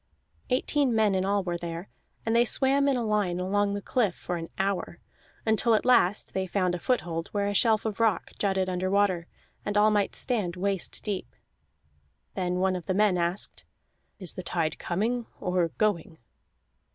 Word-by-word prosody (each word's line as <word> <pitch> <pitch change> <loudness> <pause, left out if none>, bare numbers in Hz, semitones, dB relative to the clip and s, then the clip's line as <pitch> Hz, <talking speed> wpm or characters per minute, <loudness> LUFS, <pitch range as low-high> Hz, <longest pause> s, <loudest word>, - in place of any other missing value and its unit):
Eighteen 265 0 +1
men 215 -2 +3
in 190 0 +1
all 200 0 +1
were 175 -1 -3
there, 170 +2 -5 0.4
and 225 0 +1
they 235 - +6
swam 275 +3 +4
in 275 -2 +2
a 235 - -1
line 205 -5 0
along 200 +2 +1
the 205 - -5
cliff 220 -9 +1
for 175 - -4
an 165 0 -5
hour, 195 -1 -2 0.5
until 220 +1 +3
at - - 0
last 210 -5 +3
they 190 0 -1
found 185 -1 0
a 175 - -2
foothold 170 -8 -1
where 200 -1 0
a 205 - -1
shelf 220 +1 +2
of 215 -1 -3
rock 225 -4 +1
jutted 190 -2 +1
under 185 0 -1
water, 190 -4 +2 0.4
and 205 0 -1
all 210 +1 +5
might 205 -1 +1
stand 205 -9 -1
waist 195 0 -2
deep. 205 -3 -4 1.0
Then 180 -2 -1
one 185 +1 +1
of 175 -3 -6
the 185 - 0
men 205 -2 +3
asked: 175 +2 -1 0.5
"Is 185 -5 -5
the - - -6
tide 165 -3 -2
coming 225 +6 -1
or 180 -2 +1
going?" 180 -6 0
200 Hz, 180 wpm, -27 LUFS, 180-215 Hz, 1.0 s, they